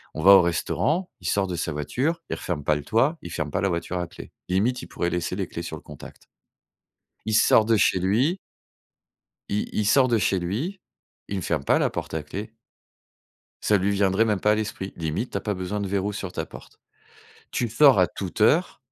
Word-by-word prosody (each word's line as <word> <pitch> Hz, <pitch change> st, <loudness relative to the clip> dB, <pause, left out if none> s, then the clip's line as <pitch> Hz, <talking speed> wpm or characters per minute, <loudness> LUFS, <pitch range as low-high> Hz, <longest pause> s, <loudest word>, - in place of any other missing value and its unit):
On 80 Hz, -, -3 dB
va 95 Hz, -, +9 dB
au 100 Hz, -, +9 dB
restaurant, 150 Hz, -, 0 dB
il -, -, -5 dB
sort 100 Hz, -1 st, +1 dB
de 90 Hz, -, -3 dB
sa 85 Hz, 0 st, -2 dB
voiture, 125 Hz, -, -1 dB
il -, -, -2 dB
referme 80 Hz, -5 st, -4 dB
pas 75 Hz, -, +3 dB
le 75 Hz, -, -4 dB
toit, 130 Hz, -, +2 dB
il 85 Hz, -, -8 dB
ferme 80 Hz, -4 st, -3 dB
pas 100 Hz, -, -1 dB
la 100 Hz, -, +1 dB
voiture 85 Hz, +1 st, -2 dB
à 90 Hz, -, -3 dB
clé. -, -, -12 dB, 0.2 s
Limite, 110 Hz, +8 st, +1 dB
il -, -, -9 dB
pourrait 85 Hz, -, -2 dB
laisser 90 Hz, +1 st, -2 dB
les 95 Hz, -3 st, -2 dB
clés 85 Hz, -, -6 dB
sur 85 Hz, -2 st, -6 dB
le -, -, -13 dB
contact. 75 Hz, -2 st, -13 dB, 1.0 s
Il 110 Hz, -, -1 dB
sort 110 Hz, 0 st, +5 dB
de 115 Hz, +1 st, +3 dB
chez 95 Hz, -, +3 dB
lui 115 Hz, -, +1 dB, 1.1 s
il 105 Hz, -, 0 dB
il 105 Hz, -, 0 dB
sort 130 Hz, +3 st, +5 dB
de 120 Hz, -2 st, +2 dB
chez 95 Hz, 0 st, +1 dB
lui, 120 Hz, -, -3 dB, 0.5 s
il 100 Hz, -, -3 dB
ne -, -, -3 dB
ferme -, -, -1 dB
pas -, -, +3 dB
la -, -, +2 dB
porte -, -, -6 dB
à 80 Hz, -, -1 dB
clé 100 Hz, +9 st, -7 dB, 1.1 s
ça 105 Hz, -, +3 dB
lui 100 Hz, +2 st, 0 dB
viendrait 100 Hz, +2 st, +2 dB
même 105 Hz, -3 st, +1 dB
pas 105 Hz, -, +3 dB
à -, -, +4 dB
l'esprit. 105 Hz, -3 st, -4 dB
Limite, 80 Hz, +9 st, -3 dB
tu -, -, -2 dB
as -, -, -4 dB
pas 105 Hz, -, -2 dB
besoin 95 Hz, +2 st, -4 dB
de 100 Hz, -, -2 dB
verrous 100 Hz, +1 st, -1 dB
sur 95 Hz, -3 st, -5 dB
ta -, -, -4 dB
porte. -, -, -14 dB, 0.7 s
Tu 120 Hz, -, -1 dB
sors 130 Hz, +2 st, +6 dB
à 90 Hz, -, +5 dB
toute 95 Hz, +3 st, -7 dB
heure 155 Hz, +12 st, +3 dB
100 Hz, 225 wpm, -25 LUFS, 90-110 Hz, 1.1 s, va